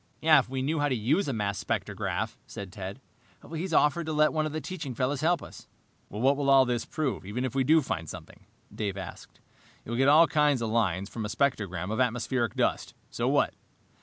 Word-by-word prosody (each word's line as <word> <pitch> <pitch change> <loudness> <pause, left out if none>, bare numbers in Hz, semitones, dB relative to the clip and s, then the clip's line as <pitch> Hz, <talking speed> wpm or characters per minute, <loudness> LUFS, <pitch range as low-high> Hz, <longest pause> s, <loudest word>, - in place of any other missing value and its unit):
"If 155 -6 +5
we 130 0 -2
knew 155 +3 0
how 145 0 +1
to 130 - +1
use 140 - +1
a - - 0
mass 105 -4 -2
spectrograph," - - -2
said 100 -2 -8
Ted. 95 +4 -7 0.5
"He's 170 +3 -3
offered 155 +1 +2
to 155 - -2
let 155 0 +3
one 155 -1 0
of - - -6
the 155 - -3
teaching 150 -7 -6
fellows 130 +3 -1
help 170 0 +2
us." - - -12 0.4
"What 130 +7 +1
will 140 -1 0
all 135 -1 +7
this 120 -2 -1
prove, 140 -9 -2
even 110 +7 -3
if 125 - -3
we 135 -1 +2
do 155 +3 +4
find 80 -9 -4
something?" - - -11 0.3
Dave 100 -3 -3
asked. 95 -2 -9 0.5
"You'll 120 +1 -3
get 135 +2 +4
all 155 +3 +8
kinds 150 -6 +2
of 110 - -2
lines 100 -5 +1
from 110 +1 -6
a 105 - -3
spectrogram 100 -7 -1
of 110 - -2
atmospheric 125 -1 0
dust. - - -1 0.2
So - - -1
what?" - - +2
130 Hz, 210 wpm, -28 LUFS, 110-150 Hz, 0.5 s, all